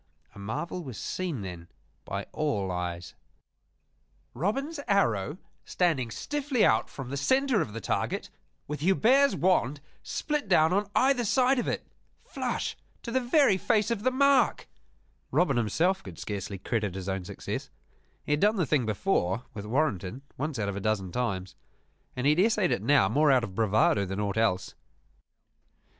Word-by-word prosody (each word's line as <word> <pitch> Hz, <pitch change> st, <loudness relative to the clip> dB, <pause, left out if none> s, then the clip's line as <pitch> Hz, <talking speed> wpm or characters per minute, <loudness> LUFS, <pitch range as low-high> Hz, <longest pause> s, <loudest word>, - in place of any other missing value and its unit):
A -, -, -12 dB
marvel 150 Hz, -, -4 dB
was 130 Hz, -8 st, -8 dB
seen 175 Hz, -, -3 dB
then 90 Hz, -3 st, -7 dB, 0.4 s
by 100 Hz, 0 st, -4 dB
all 105 Hz, -12 st, -1 dB
eyes 90 Hz, -1 st, -4 dB, 1.2 s
Robin's 275 Hz, -, -2 dB
arrow 135 Hz, -, +1 dB, 0.3 s
standing 155 Hz, -10 st, 0 dB
stiffly 280 Hz, -, 0 dB
out -, -, +2 dB
from 135 Hz, -2 st, -8 dB
the -, -, -2 dB
center 260 Hz, -, +2 dB
of -, -, -3 dB
the 115 Hz, -, -4 dB
target, -, -, -2 dB, 0.4 s
with 150 Hz, +1 st, -4 dB
Hubert's 235 Hz, -, +4 dB
wand 150 Hz, -6 st, +2 dB, 0.2 s
split 295 Hz, -5 st, -2 dB
down 165 Hz, -2 st, +4 dB
on 200 Hz, +1 st, 0 dB
either 260 Hz, -1 st, +3 dB
side 255 Hz, +3 st, +3 dB
of -, -, -2 dB
it -, -, -2 dB, 0.4 s
flush -, -, -3 dB, 0.3 s
to 235 Hz, -, -5 dB
the 260 Hz, -, +2 dB
very 255 Hz, -4 st, +3 dB
face 215 Hz, +4 st, +1 dB
of 225 Hz, -3 st, -1 dB
the 255 Hz, -, +3 dB
mark! 270 Hz, -1 st, +3 dB, 0.6 s
Robin 145 Hz, -2 st, +2 dB
himself 165 Hz, -, +1 dB
could 90 Hz, -4 st, -10 dB
scarcely 100 Hz, -1 st, -5 dB
credit 105 Hz, -1 st, -2 dB
his 95 Hz, -1 st, -6 dB
own 95 Hz, -1 st, -2 dB
success. -, -, -5 dB, 0.6 s
He -, -, -3 dB
had 150 Hz, -, +3 dB
done 210 Hz, +4 st, +3 dB
the 180 Hz, -5 st, +1 dB
thing 135 Hz, -5 st, +1 dB
before, 110 Hz, -, 0 dB
with 105 Hz, -1 st, -7 dB
Warrenton, 125 Hz, -, -1 dB
once 150 Hz, 0 st, -3 dB
out 105 Hz, -2 st, -1 dB
of 100 Hz, -, -3 dB
a -, -, -3 dB
dozen 95 Hz, -3 st, -1 dB
times: 95 Hz, -6 st, -3 dB, 0.6 s
and 125 Hz, -, -3 dB
he 145 Hz, -, +6 dB
had 155 Hz, -, +1 dB
essayed 210 Hz, -2 st, +3 dB
it -, -, 0 dB
now 140 Hz, -8 st, +4 dB
more 145 Hz, +8 st, +3 dB
out 130 Hz, -2 st, +4 dB
of 100 Hz, -5 st, -5 dB
bravado 105 Hz, -1 st, +2 dB
than 95 Hz, +2 st, -4 dB
aught 100 Hz, 0 st, -2 dB
else. 90 Hz, -5 st, +1 dB
140 Hz, 165 wpm, -28 LUFS, -, 1.2 s, he